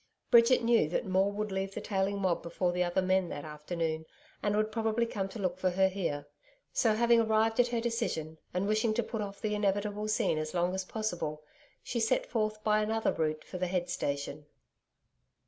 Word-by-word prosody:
Bridget 235 +1 +6
knew 230 -9 +4
that 175 - -1
Maule 190 +1 +2
would 210 0 -3
leave 190 0 -3
the - - -2
tailing 195 0 -1
mob 185 -3 +1
before 175 +1 -1
the 180 0 +1
other 175 +1 0
men 185 -1 +2
that 145 - -6
afternoon, 160 +1 -3 0.3
and 205 0 +1
would 215 +1 +1
probably 225 +1 +1
come 195 -4 -3
to 230 - -8
look 185 -3 -2
for 185 - +2
her 190 +1 +3
here. 170 -7 -3 0.5
So 220 -3 +3
having 235 +1 +4
arrived 220 +1 +2
at 245 - +5
her 240 -1 -1
decision 230 -10 -2
and 185 +3 -1
wishing 215 +1 +2
to 240 - +1
put 225 0 -4
off 200 -1 -6
the 210 -1 -1
inevitable 205 +1 0
scene 215 -7 +1
as 155 +2 -4
long 175 +1 +1
as 190 0 -2
possible, 175 -8 -3 0.4
she 235 - -2
set 225 +3 +2
forth 215 -2 -2
by 215 0 +3
another 220 +1 +1
route 155 -1 -1
for 180 - -7
the 180 - 0
head 175 -1 -1
station. 140 -1 -3
195 Hz, 200 wpm, -31 LUFS, 175-220 Hz, 0.5 s, Bridget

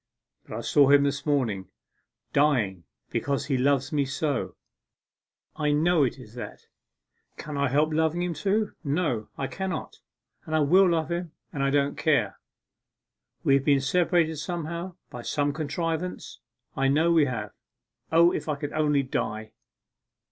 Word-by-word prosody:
But - - -6
I - - -4
saw 140 -2 +4
him 140 0 +6
this 140 +1 -2
morning 115 -10 0 0.7
dying 115 - +2 0.3
because 140 0 -1
he 140 -2 0
loves 135 +1 +1
me 145 -1 +2
so 140 0 -2 1.0
I 150 -1 0
know 165 +2 +3
it 130 0 -1
is 120 -5 -13
that! 120 - -8 0.7
Can 150 -1 -6
I 140 0 +1
help 150 +4 +2
loving 160 +2 +1
him 180 -1 -1
too? 200 +6 0
No, 145 -7 -1
I 135 - -2
cannot, 190 +6 -5 0.5
and 155 - -1
I - - +3
will 180 +6 +5
love 165 -1 0
him, 170 -2 -3 0.2
and 140 - -3
I 140 - +2
don't 140 0 +1
care! 130 - +1 1.0
We 135 - +3
have 135 0 +3
been 140 -1 +4
separated 165 +2 +1
somehow 170 +2 -4 0.2
by 120 - -7
some 145 +3 -1
contrivance 165 +3 -3 0.4
I 135 0 +1
know 155 +5 +3
we 160 -3 +5
have. 110 -6 -4 0.6
O, 170 +2 +6
if - - -4
I 150 - +1
could 145 0 -5
only 150 -2 +2
die! 110 -4 -3
145 Hz, 155 wpm, -26 LUFS, 135-165 Hz, 1.0 s, him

